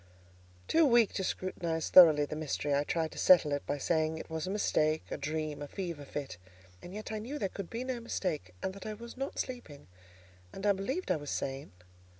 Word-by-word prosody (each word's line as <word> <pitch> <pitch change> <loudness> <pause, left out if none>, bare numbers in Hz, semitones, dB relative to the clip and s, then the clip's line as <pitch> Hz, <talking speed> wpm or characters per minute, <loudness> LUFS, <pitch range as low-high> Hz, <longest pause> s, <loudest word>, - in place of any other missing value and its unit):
Too 330 - +4
weak 240 -6 +5
to 190 - -2
scrutinize 170 -4 -2
thoroughly 155 -5 +9
the 150 - -6
mystery, 150 -1 -2
I 140 +1 +2
tried 160 +1 -1
to - - -8
settle 170 -5 +6
it 145 0 -1
by 145 - -1
saying 160 +2 0
it 160 - -9
was 160 +1 -3
a - - -2
mistake, 155 -6 +1
a - - -1
dream, 155 -1 -3
a 145 - -5
fever 170 -5 -5
fit; 135 -9 -5 0.4
and 175 - -10
yet 215 +3 -6
I 215 - -2
knew 250 +8 -5
there 195 -9 -1
could 195 -3 -7
be 235 +2 -4
no 255 -2 -3
mistake, 160 - -3
and 190 - -2
that 200 +1 -9
I 215 - -4
was 235 +2 -10
not 270 +2 -4
sleeping, 240 - -5 0.7
and 195 - -7
I 205 - +5
believed 230 - -2
I - - +2
was 145 -1 -7
sane. 135 +1 -3
170 Hz, 215 wpm, -32 LUFS, 150-210 Hz, 0.7 s, thoroughly